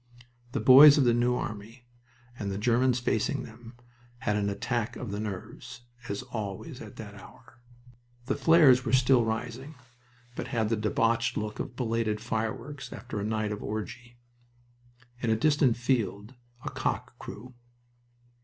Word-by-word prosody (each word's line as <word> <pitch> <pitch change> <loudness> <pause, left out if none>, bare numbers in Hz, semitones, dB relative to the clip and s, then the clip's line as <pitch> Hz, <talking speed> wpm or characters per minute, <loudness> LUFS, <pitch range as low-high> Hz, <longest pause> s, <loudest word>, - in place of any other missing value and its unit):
The - - 0
boys 140 +3 +9
of 140 - +4
the 120 -2 +4
New 120 +1 +2
Army, 115 +1 -6 0.5
and 100 - -3
the 95 - -3
Germans 125 +3 +2
facing 115 -3 -1
them, 115 +2 -12 0.5
had 105 - 0
an 100 -1 0
attack 110 +3 -2
of 120 -5 -6
the 100 - -4
nerves, 105 +2 -7 0.3
as 100 +5 -3
always 105 -6 -6
at - - -10
that - - -9
hour. 120 - -17 0.7
The 135 - 0
flares 140 -4 +5
were 120 -1 -3
still 130 -1 +5
rising, 120 +6 -4 0.6
but - - -5
had 110 -2 -1
the 115 - +2
debauched 115 +2 0
look 105 0 -4
of 120 - -5
belated 115 -3 -1
fireworks 120 +4 -4
after 120 -3 -6
a - - -3
night 110 0 -1
of 105 - -5
orgy. 120 +3 -6 1.0
In 120 - -1
a 110 - +3
distant 140 0 +3
field 115 -3 -1 0.3
a - - -3
cock - - -3
crew. 125 +4 -9
115 Hz, 155 wpm, -28 LUFS, 110-125 Hz, 1.0 s, boys